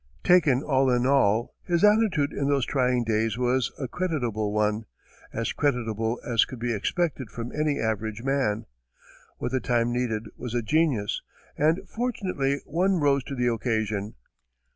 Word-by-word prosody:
Taken 155 Hz, -7 st, +4 dB
all 135 Hz, -2 st, +2 dB
in 125 Hz, 0 st, +2 dB
all, 120 Hz, -5 st, +2 dB
his 170 Hz, 0 st, 0 dB
attitude 210 Hz, -9 st, +3 dB
in 140 Hz, -, -1 dB
those 140 Hz, -3 st, +2 dB
trying 125 Hz, -3 st, +1 dB
days 110 Hz, -1 st, 0 dB
was 125 Hz, -2 st, +1 dB
a 135 Hz, -, -3 dB
creditable 120 Hz, -, -2 dB
one 105 Hz, +1 st, 0 dB, 0.5 s
as 115 Hz, 0 st, -2 dB
creditable 115 Hz, -4 st, -1 dB
as 115 Hz, -2 st, +3 dB
could 130 Hz, -, -7 dB
be 120 Hz, 0 st, -1 dB
expected 135 Hz, -, -1 dB
from 115 Hz, +3 st, -6 dB
any 150 Hz, -1 st, 0 dB
average 110 Hz, 0 st, -2 dB
man. 130 Hz, -5 st, 0 dB, 0.7 s
What 125 Hz, -, -3 dB
the 130 Hz, -, +1 dB
time 120 Hz, -1 st, +1 dB
needed 115 Hz, -3 st, -1 dB
was 125 Hz, -1 st, -6 dB
a 120 Hz, -, 0 dB
genius, 135 Hz, -5 st, +1 dB, 0.3 s
and 155 Hz, +4 st, +1 dB
fortunately 185 Hz, -, -1 dB
one 185 Hz, +5 st, +1 dB
rose 140 Hz, -2 st, +2 dB
to 140 Hz, -, -5 dB
the 125 Hz, -2 st, +1 dB
occasion. 110 Hz, -3 st, -2 dB
125 Hz, 155 wpm, -26 LUFS, 115-145 Hz, 0.7 s, Taken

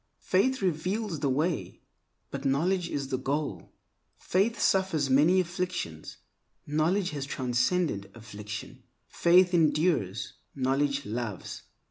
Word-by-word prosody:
Faith 225 Hz, +5 st, +2 dB
reveals 185 Hz, +2 st, -1 dB
the 140 Hz, -, 0 dB
way, 155 Hz, +6 st, -1 dB, 0.5 s
but 140 Hz, 0 st, -5 dB
knowledge 170 Hz, +6 st, +1 dB
is 140 Hz, -2 st, -3 dB
the 130 Hz, -2 st, -1 dB
goal. 140 Hz, +3 st, -3 dB, 0.5 s
Faith 205 Hz, +6 st, +1 dB
suffers 175 Hz, -8 st, +2 dB
many 155 Hz, +8 st, +5 dB
afflictions; 175 Hz, -, -3 dB, 0.5 s
knowledge 170 Hz, +6 st, +1 dB
has 145 Hz, -2 st, -4 dB
transcended 125 Hz, -, 0 dB
affliction. 105 Hz, -1 st, -8 dB, 0.3 s
Faith 180 Hz, +1 st, +4 dB
endures; 150 Hz, -, +1 dB, 0.2 s
knowledge 140 Hz, +1 st, 0 dB
loves. 110 Hz, -4 st, -5 dB
150 Hz, 105 wpm, -28 LUFS, 130-180 Hz, 0.5 s, many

